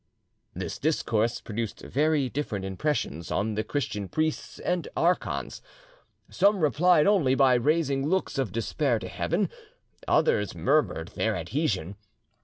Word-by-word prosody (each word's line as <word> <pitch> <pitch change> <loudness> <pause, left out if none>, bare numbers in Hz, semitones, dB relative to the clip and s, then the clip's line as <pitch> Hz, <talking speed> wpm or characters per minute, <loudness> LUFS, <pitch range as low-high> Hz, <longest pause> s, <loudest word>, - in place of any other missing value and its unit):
This - - -5
discourse 120 -7 0
produced 115 0 -5
very 150 -1 +1
different 120 -7 -3
impressions 95 - -2
on 110 +2 -1
the 110 +1 -1
Christian 110 -9 -3
priests 155 0 -2
and 180 -1 -2
archons. 175 +2 0 0.7
Some 200 +2 +3
replied 155 +2 +4
only 170 -11 +3
by 135 -2 +5
raising 140 +1 +1
looks 185 -4 0
of 130 -8 -1
despair 115 +4 0
to 95 -4 -6
Heaven, 170 - -1 0.6
others 475 +1 +2
murmured - - +1
their - - -1
adhesion. 100 - -2
135 Hz, 125 wpm, -27 LUFS, 110-160 Hz, 0.7 s, by